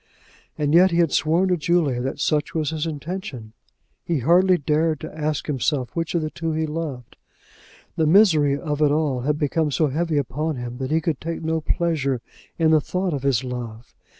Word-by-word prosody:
And 145 0 0
yet 180 +3 +7
he 170 - -1
had 170 -4 +3
sworn 170 +5 +2
to 180 - +2
Julia 155 -6 +1
that 135 +3 -4
such 150 +1 0
was 155 -2 0
his 160 0 -2
intention. 150 - -6 0.5
He 170 - -1
hardly 180 +6 +4
dared 155 +1 0
to - - -8
ask 155 -1 -2
himself 135 -3 -1
which 165 0 -2
of 165 - +1
the 155 - -3
two 165 -1 -3
he 160 0 0
loved. 150 -6 -6 0.8
The 160 - +2
misery 155 -6 +5
of 150 -2 -3
it 150 - +5
all 145 -3 0
had 150 +3 0
become 150 +1 0
so 150 +1 +1
heavy 160 +2 -1
upon 145 +4 -2
him, 125 0 -6
that 130 -1 -3
he 160 +2 +1
could 160 -4 -2
take 165 0 -4
no 160 0 -1
pleasure 150 -6 0 0.4
in 160 -1 +3
the 155 -1 +5
thought 180 +2 -2
of 140 - -3
his 135 -3 +1
love. 120 -2 -7
155 Hz, 200 wpm, -23 LUFS, 140-165 Hz, 0.8 s, yet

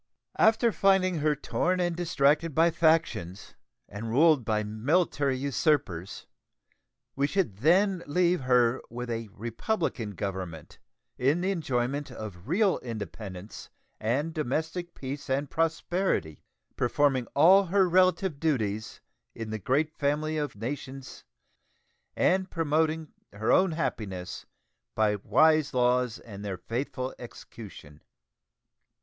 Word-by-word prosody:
After 225 +1 +4
finding 190 -4 +2
her 150 0 +2
torn 180 +5 -1
and 175 -1 0
distracted 155 -2 +1
by 165 +1 +4
factions, 160 - 0 0.3
and 110 +3 -6
ruled 150 +2 +4
by 110 -1 0
military 135 - 0
usurpers, 130 - -1 0.9
we 140 +1 +1
should 165 - -1
then 180 - +3
leave 175 +2 +2
her 125 -1 +3
with 120 +1 -5
a 115 -1 -3
republican 115 - -3
government 95 -5 -6 0.4
in 140 +7 +2
the 190 +2 0
enjoyment 140 -4 -2
of 100 -3 -9
real 195 +5 +2
independence 105 -4 -8 0.3
and 140 +9 -1
domestic 160 +4 -3
peace 140 +2 -6
and 135 +1 -1
prosperity, 165 - -1 0.3
performing 130 -1 +1
all 185 +7 +6
her 190 +1 +3
relative 185 -3 +2
duties 110 -9 -2 0.3
in 115 -1 -6
the 110 - -3
great 145 - +1
family 150 +2 -1
of 150 -5 -3
nations 130 +4 -7 0.9
and 190 0 +2
promoting 160 -1 0 0.2
her 110 +2 -1
own 185 -3 +4
happiness 95 - -4 0.5
by 105 -1 +2
wise 155 +6 +3
laws 125 -1 +2
and 100 -3 -10
their 100 -2 -4
faithful 130 +3 -4
execution. 100 -10 -11
140 Hz, 115 wpm, -28 LUFS, 115-165 Hz, 0.9 s, all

